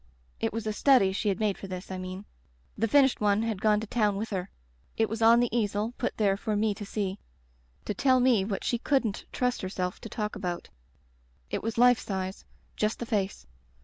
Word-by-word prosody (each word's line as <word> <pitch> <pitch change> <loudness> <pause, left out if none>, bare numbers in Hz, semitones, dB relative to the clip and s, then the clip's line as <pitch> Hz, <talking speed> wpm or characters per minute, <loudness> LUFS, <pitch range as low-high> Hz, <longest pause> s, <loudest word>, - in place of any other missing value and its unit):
"It - - 0
was 225 +1 -4
a 215 - -1
study 245 -4 +4
she 200 +2 -1
had 195 - -1
made 210 -3 0
for 195 - -7
this, 185 0 -7
I 185 - -4
mean. 185 +2 -6 0.5
The 225 - 0
finished 270 0 +4
one 205 +1 +3
had 220 -4 -2
gone 210 -1 +4
to - - -4
town 210 -2 +1
with 220 +2 -4
her. 190 -1 -3 0.5
It 225 - +3
was 225 +2 -5
on 230 +1 +7
the 240 -1 0
easel, 215 0 0
put 250 - -2
there 200 -3 +3
for 215 0 -2
me 210 0 +1
to 205 - -8
see 200 -2 -3 0.3
— - - -37
^to - - -2
tell 260 +3 +4
me 245 -5 +4
what 195 0 -3
she 240 - 0
couldn't 245 -6 0
trust 250 -1 0
herself 185 0 -3
to - - -7
talk 210 -2 -3
about. 175 -2 -4 0.8
It - - -1
was 225 +1 -3
life 245 0 +6
size 190 -1 -4
— - - -36
just 215 +1 +1
the 235 - -5
face. 195 - -2
210 Hz, 220 wpm, -28 LUFS, 195-230 Hz, 0.8 s, on